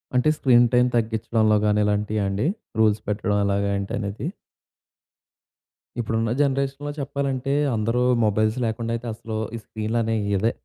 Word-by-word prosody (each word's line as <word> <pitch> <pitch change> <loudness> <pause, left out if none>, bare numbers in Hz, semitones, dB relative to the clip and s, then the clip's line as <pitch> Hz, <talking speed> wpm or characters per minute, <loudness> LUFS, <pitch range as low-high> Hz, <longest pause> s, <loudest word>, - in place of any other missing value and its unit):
అంటే, 125 +4 +4
screen 120 -2 +5
time 125 0 +5
తగ్గించడంలో 110 -1 +2
గాని 105 0 +3
ఇలాంటియా 105 0 0
అండి? 100 +9 0 0.3
రూల్స్ 110 -1 +3
పెట్టడం 105 0 0
ఎలాగా 100 0 0
ఏంటి 100 0 -4
అనేది? 105 +6 -4 1.7
ఇప్పుడున్న 115 -1 -1
జనరేషన్‌‌లో 140 +1 -1
చెప్పాలంటే, 140 -1 -2 0.2
అందరూ 115 +3 0 0.2
మొబైల్స్ 110 +2 +1
లేకుండా 115 +1 -2
అయితే 120 +1 -6
అసలు, 110 0 -6 0.2
ఈ - - -3
స్క్రీన్‌లనేవి 110 -1 -1
ఇదే, 110 +5 +1
110 Hz, 130 wpm, -23 LUFS, 105-125 Hz, 1.7 s, screen